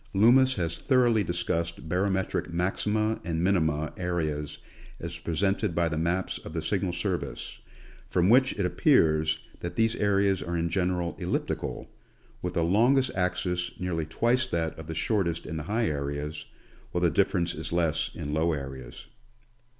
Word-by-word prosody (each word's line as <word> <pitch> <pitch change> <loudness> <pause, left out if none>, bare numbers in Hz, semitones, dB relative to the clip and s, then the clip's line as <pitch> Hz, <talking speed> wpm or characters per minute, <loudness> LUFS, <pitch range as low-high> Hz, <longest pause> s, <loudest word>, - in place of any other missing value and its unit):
Loomis 130 +6 +6
has 85 -3 -2
thoroughly 120 -5 +3
discussed 85 -2 -2
barometric 95 +1 0
maxima 105 +5 0
and 85 -1 -1
minima 80 -5 +1
areas 80 -5 -2 0.4
as - - -6
presented 95 +3 0
by 85 -1 +2
the 80 -1 -2
maps 85 +3 -1
of - - -10
the 80 - -2
Signal 95 +1 0
Service, 85 -6 -3 0.5
from 90 0 +2
which 130 +5 +5
it 100 - -1
appears 80 -3 +3 0.2
that 85 0 -5
these 115 +2 +2
areas 100 -2 +2
are 85 0 -2
in 85 0 0
general 90 -1 0
elliptical, - - -3 0.5
with - - -4
the 85 - +2
longest 120 +9 +3
axis 90 -1 0
nearly 85 -4 -2
twice 120 +9 +1
that 80 -6 -1
of 80 - -8
the 80 - -5
shortest 85 -3 0
in 80 - -4
the - - -3
high 115 +2 +1
areas, 75 +1 -3 0.4
while 90 - -1
the 85 - +4
difference 90 0 +1
is 80 0 -6
less 85 -3 +1
in 75 - -4
low 80 +2 +2
areas. 65 -4 -7
85 Hz, 155 wpm, -28 LUFS, 80-100 Hz, 0.5 s, Loomis